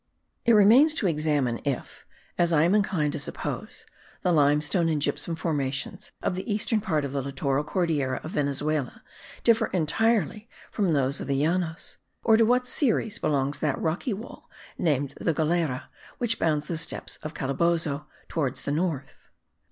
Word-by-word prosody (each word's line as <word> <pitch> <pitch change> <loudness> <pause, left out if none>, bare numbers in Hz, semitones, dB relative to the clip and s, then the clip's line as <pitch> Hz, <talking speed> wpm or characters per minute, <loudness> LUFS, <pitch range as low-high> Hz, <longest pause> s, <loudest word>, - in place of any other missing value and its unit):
It 235 - +5
remains 235 +9 +6
to 240 - -1
examine 150 -7 +1
if 140 -3 -4 0.3
(as 170 -1 +2
I 155 -2 +4
am 175 +4 +3
inclined 185 -8 +1
to - - -3
suppose) - - -5 0.4
the 180 - +2
limestone 150 +2 +3
and 155 -2 +1
gypsum 145 +3 0
formations 150 +4 -2
of - - +1
the 190 +5 -4
eastern 215 +1 +2
part 155 -8 0
of 140 - -4
the 140 0 -1
littoral 140 +1 -1
Cordillera 150 -6 0
of 155 - -6
Venezuela 145 -1 -1 0.4
differ 230 -1 +4
entirely 215 +5 0 0.2
from 200 -5 +1
those 140 -1 +1
of - - -5
the 140 0 +1
Llanos, 165 -1 -1 0.3
and 225 - +6
to 225 - +6
what 250 +2 +3
series 235 -4 0
belongs 140 -1 0
that 150 -4 0
rocky 170 - -1
wall* 220 +4 -8 0.3
named 145 -4 0
the 165 - +1
Galera, 160 -4 0 0.3
which 230 -2 0
bounds 150 -2 +1
the 165 0 -2
steppes 165 - -2
of 155 0 -8
Calabozo 150 +1 0 0.2
towards 140 -6 -2
the - - -2
north? 155 -3 -3
160 Hz, 160 wpm, -26 LUFS, 145-195 Hz, 0.4 s, remains